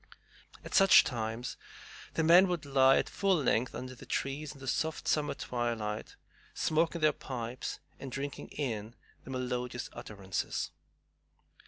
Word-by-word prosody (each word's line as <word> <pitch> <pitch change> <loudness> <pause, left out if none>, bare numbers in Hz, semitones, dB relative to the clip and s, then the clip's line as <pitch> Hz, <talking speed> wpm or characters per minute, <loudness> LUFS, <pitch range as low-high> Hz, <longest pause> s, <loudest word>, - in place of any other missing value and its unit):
At - - -8
such 195 -1 +8
times 115 -1 -3 0.6
the 160 - +2
men 175 +4 +7
would 175 -5 -2
lie 135 -1 +5
at - - +1
full 195 0 +2
length 130 -5 +1
under 130 +1 -6
the 125 - -13
trees 145 +2 -2
in 140 - -13
the 135 - -9
soft 160 +3 -1
summer 150 -1 +1
twilight, 115 -3 -3 0.4
smoking 165 +1 +1
their 155 -1 +5
pipes 125 -2 -5 0.2
and 135 - -7
drinking 140 +2 -4
in 115 -5 -4 0.3
the - - -10
melodious 125 -1 -3
utterances. 100 -2 -4
130 Hz, 140 wpm, -32 LUFS, 120-155 Hz, 0.6 s, such